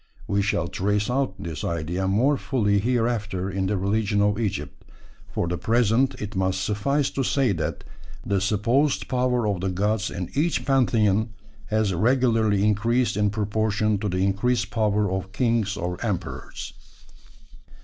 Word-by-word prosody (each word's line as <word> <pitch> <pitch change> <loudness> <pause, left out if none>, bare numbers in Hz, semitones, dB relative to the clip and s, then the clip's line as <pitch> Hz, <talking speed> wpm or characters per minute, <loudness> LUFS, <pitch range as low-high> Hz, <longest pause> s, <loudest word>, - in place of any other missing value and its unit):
We 100 0 +1
shall 95 -4 0
trace 105 +5 0
out 130 -6 0
this 80 -3 -6
idea 85 +3 -2
more 120 +10 +3
fully 105 -7 +1
hereafter 110 -5 -1
in 95 0 -1
the 100 +1 0
religion 100 +2 0
of 105 +1 +2
Egypt; 105 -4 -3 0.5
for - - -1
the 90 0 -2
present 120 +3 +2
it 105 0 -6
must 95 0 0
suffice 135 +9 0
to 135 - -2
say 135 -1 +2
that 85 -5 -3 0.4
the 100 -1 0
supposed 115 +8 +1
power 125 -2 +1
of 100 -4 -1
the 95 - 0
gods 105 +3 0
in 90 -1 -5
each 160 +4 0
pantheon 110 -5 +2 0.3
has 110 -3 +1
regularly 110 -1 +2
increased 115 +4 +1
in 105 0 +2
proportion 105 0 0
to 105 0 -2
the 95 +1 0
increased 105 +6 0
power 105 -2 +1
of 95 0 -4
kings 115 -5 0
or 90 +2 -4
emperors. 95 -7 -4
105 Hz, 150 wpm, -24 LUFS, 95-115 Hz, 0.5 s, more